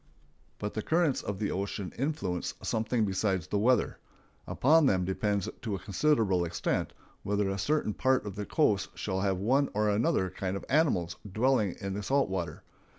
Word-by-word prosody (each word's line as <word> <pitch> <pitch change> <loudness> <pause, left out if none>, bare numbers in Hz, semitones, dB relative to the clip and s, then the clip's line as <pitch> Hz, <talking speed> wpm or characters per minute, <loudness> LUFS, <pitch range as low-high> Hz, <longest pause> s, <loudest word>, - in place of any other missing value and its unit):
But 105 0 -4
the 110 - -2
currents 160 +1 +1
of 100 -1 -4
the 105 +1 -1
ocean 100 0 -3
influence 125 - -2
something 110 0 0
besides 95 -3 0
the 105 - -1
weather. 120 +2 +2 0.5
Upon 155 +2 +4
them 95 -6 +2
depends 100 +1 -1
to 110 -4 -2
a - - -5
considerable 100 -4 +2
extent 85 0 -1 0.3
whether 100 0 0
a 95 - -3
certain 145 0 0
part 130 0 +1
of 100 -2 -5
the 105 0 -5
coast 105 -11 +1
shall 95 -2 -2
have 95 -2 +1
one 130 +9 +2
or 105 0 +2
another 105 - +1
kind 95 +1 -3
of - - -9
animals 115 - +2
dwelling 110 -3 +2
in 100 -2 -4
the 105 - -3
salt 135 +4 +1
water. 90 -3 -4
105 Hz, 175 wpm, -30 LUFS, 95-130 Hz, 0.5 s, Upon